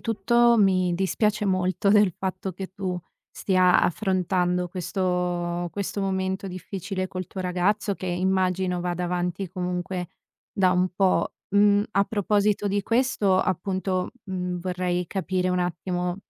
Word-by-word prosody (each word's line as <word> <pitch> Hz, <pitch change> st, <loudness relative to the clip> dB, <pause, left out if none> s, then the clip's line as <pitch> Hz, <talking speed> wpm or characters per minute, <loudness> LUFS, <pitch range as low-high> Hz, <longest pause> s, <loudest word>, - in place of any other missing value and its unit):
tutto 235 Hz, +2 st, +3 dB
mi 185 Hz, -3 st, +3 dB
dispiace 210 Hz, +3 st, 0 dB
molto 185 Hz, 0 st, +1 dB
del 210 Hz, -2 st, +5 dB
fatto 190 Hz, 0 st, -3 dB
che 190 Hz, +1 st, -7 dB
tu 185 Hz, -2 st, -3 dB, 0.3 s
stia 185 Hz, -2 st, +3 dB
affrontando 180 Hz, -1 st, 0 dB
questo 175 Hz, -1 st, -2 dB
questo 200 Hz, 0 st, -3 dB
momento 190 Hz, 0 st, -1 dB
difficile 185 Hz, +1 st, -4 dB
col 185 Hz, -1 st, -5 dB
tuo 190 Hz, -, -6 dB
ragazzo 195 Hz, +3 st, 0 dB
che 185 Hz, -, -7 dB
immagino 185 Hz, 0 st, 0 dB
vada 180 Hz, 0 st, -2 dB
avanti 180 Hz, +2 st, -2 dB
comunque 180 Hz, -1 st, -3 dB, 0.4 s
da 185 Hz, -2 st, +2 dB
un 180 Hz, 0 st, +2 dB
po'. 190 Hz, 0 st, +2 dB, 0.2 s
Mhmm, 205 Hz, 0 st, +4 dB
a 200 Hz, 0 st, +3 dB
proposito 205 Hz, 0 st, +1 dB
di 200 Hz, 0 st, 0 dB
questo, 230 Hz, -5 st, +2 dB
appunto, 185 Hz, 0 st, -1 dB
mhmm, 180 Hz, -2 st, -3 dB
vorrei 180 Hz, 0 st, -2 dB
capire 185 Hz, -1 st, -1 dB
un 180 Hz, -, +1 dB
attimo, 180 Hz, 0 st, -2 dB
185 Hz, 135 wpm, -25 LUFS, 180-195 Hz, 0.4 s, del